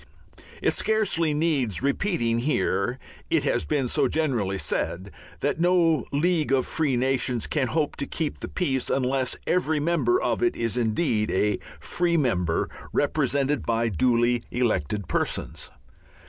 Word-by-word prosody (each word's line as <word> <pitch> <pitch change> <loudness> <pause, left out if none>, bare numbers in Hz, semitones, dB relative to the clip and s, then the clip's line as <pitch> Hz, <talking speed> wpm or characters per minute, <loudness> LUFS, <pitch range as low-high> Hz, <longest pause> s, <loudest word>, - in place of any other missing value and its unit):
It - - +3
scarcely 200 -7 +1
needs 145 - 0
repeating 140 - 0
here 120 -4 0 0.3
it - - +2
has - - 0
been 135 - 0
so - - +2
generally 120 -12 0
said 95 +1 -2 0.3
that 145 +3 0
no 170 -4 +3
League 155 0 +1
of 130 -2 +3
Free 145 -6 0
Nations 125 -2 0
can 140 -4 0
hope 155 +3 -1
to 140 - -3
keep 160 -3 -3
the - - -5
peace 135 -8 -1
unless 130 0 0
every 160 -4 +1
member 170 - +2
of - - -1
it 360 -1 +2
is 115 -1 -2
indeed 110 -1 0
a 105 +2 +1 0.2
free 175 -1 0
member, 90 - +1 0.2
represented 140 +1 +1
by 115 0 0
duly 120 +5 +2
elected 105 - -1
persons. - - -2
135 Hz, 140 wpm, -25 LUFS, 115-160 Hz, 0.3 s, It